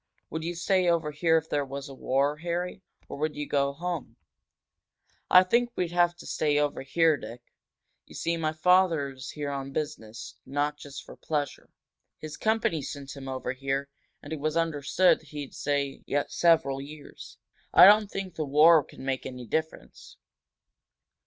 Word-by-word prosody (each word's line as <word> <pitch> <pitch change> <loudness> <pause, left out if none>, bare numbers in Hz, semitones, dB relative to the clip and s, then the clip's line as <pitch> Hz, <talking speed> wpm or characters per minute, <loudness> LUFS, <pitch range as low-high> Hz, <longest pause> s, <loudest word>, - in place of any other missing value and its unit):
"Would 160 +1 -4
you 175 +1 -3
stay 180 +1 +2
over 165 -3 +1
here 165 +2 +2
if 160 0 -2
there 145 -2 0
was 140 +1 -7
a 135 - -9
war, 140 +3 0
Harry? 175 +3 -3 0.3
Or - - -8
would 155 0 -1
you 145 0 -4
go 140 -1 +1
home?" 155 -6 -5 1.1
"I 185 - +8
think 235 +6 +2
we'd 175 -2 -1
have 175 0 +2
to - - -13
stay 150 -1 0
over 145 -1 0
here, 160 +3 +2
Dick. 120 +1 -10 0.6
You - - -14
see, 170 - -1
my 160 -2 -1
father 165 -3 +3
is 130 -1 -9
here 145 -1 -4
on 135 -1 -5
business, 140 -8 -5
not 145 +1 -2
just 140 -2 -9
for - - -12
pleasure. 150 -2 -4 0.5
His 155 -1 -8
company 220 -8 0
sent 140 0 -7
him 135 -1 -9
over 130 -1 -3
here, 135 +1 -3 0.3
and 145 - -6
it 155 - -4
was 155 +2 -1
understood 165 +2 +2
he'd 150 -3 -8
stay 140 -1 -2 0.3
several 155 -5 +2
years. 145 +1 -11 0.3
I - - +9
don't 210 +1 +6
think 195 -3 -5
the 160 - -3
war 155 +2 +6
could - - -14
make 130 0 -3
any 125 -1 -8
difference." 155 - -5
150 Hz, 170 wpm, -27 LUFS, 140-170 Hz, 1.1 s, I